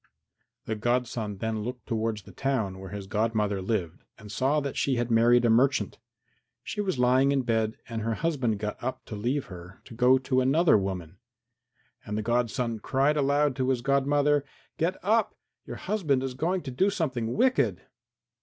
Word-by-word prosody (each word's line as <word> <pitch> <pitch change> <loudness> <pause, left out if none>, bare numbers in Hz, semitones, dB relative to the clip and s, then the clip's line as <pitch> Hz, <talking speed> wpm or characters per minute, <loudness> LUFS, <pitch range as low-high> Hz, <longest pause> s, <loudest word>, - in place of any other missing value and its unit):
The 110 - -2
godson 115 -2 -1
then 110 +1 -2
looked 125 +1 -6
towards 110 -2 -2
the - - -13
town 115 -9 -2
where 95 0 -8
his 100 0 -6
godmother 105 -1 0
lived 95 -4 -3
and 105 -1 -11
saw 135 +7 +1
that 140 -2 -4
she 135 - +1
had 120 0 -1
married 120 +1 +5
a - - +4
merchant. 130 +4 +2 0.6
She 210 - -3
was 190 -8 -1
lying 130 +2 +4
in 135 -2 +1
bed 110 -2 0
and 115 -1 -4
her 115 +1 -1
husband 130 -9 0
got 105 +2 -5
up 130 +1 -4
to 110 - -7
leave 125 +7 -1
her 90 -3 -11
to - - -12
go 125 +3 +5
to 130 0 +1
another 155 +6 +4
woman. 95 -3 -3 0.8
And 105 0 -4
the 110 - -2
godson 120 0 0
cried 135 +6 +1
aloud 145 -1 +2
to 130 0 0
his 130 -2 +1
godmother, 140 +1 +2 0.4
"Get 170 +4 0
up! 220 +3 +1 0.3
Your - - -6
husband 160 -10 0
is 135 -1 -3
going 175 +7 -1
to 135 - -5
do 185 +11 +2
something 130 - -2
wicked!" 255 +2 +2
125 Hz, 180 wpm, -27 LUFS, 110-140 Hz, 0.8 s, married